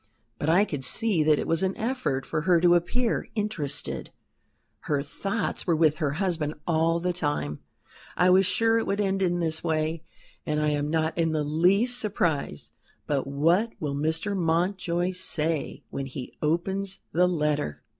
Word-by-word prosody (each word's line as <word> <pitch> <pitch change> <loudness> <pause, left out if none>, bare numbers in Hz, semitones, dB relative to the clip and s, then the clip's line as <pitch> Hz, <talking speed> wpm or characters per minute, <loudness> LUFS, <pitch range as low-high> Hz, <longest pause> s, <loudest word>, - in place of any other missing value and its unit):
But 150 - -1
I 185 +5 +5
could 145 -9 -5
see 200 - +3
that 155 -1 +4
it - - -2
was 165 0 +1
an 190 0 -1
effort 225 - -1
for 155 - -2
her 170 +1 +4
to 175 0 +5
appear 225 +8 0
interested 195 -10 -3 0.7
her 145 -2 0
thoughts 195 +9 -3
were 170 - +3
with 155 -1 +3
her 150 -4 -1
husband 160 -3 -1
all 165 0 +2
the 180 +1 -1
time. 145 - -2 0.6
I 180 0 +5
was 190 0 +5
sure 225 +2 +2
it - - -3
would 200 - -1
end 195 -1 0
in 175 -2 +1
this 160 -1 -1
way, 160 0 -1 0.4
and 150 0 -1
I 150 0 +2
am 145 0 -1
not 160 0 0
in 165 -1 +1
the 155 -1 0
least 190 +11 +3
surprised. 170 - -1 0.3
But 140 -2 -1
what 170 +11 +2
will 145 -3 -2
Mr. 160 +8 -1
Mountjoy 175 +1 0
say 160 -4 -2
when 135 -1 -4
he 130 -1 -7
opens 190 +5 -1
the 180 +2 +3
letter?" 150 - -1
165 Hz, 170 wpm, -26 LUFS, 150-190 Hz, 0.7 s, I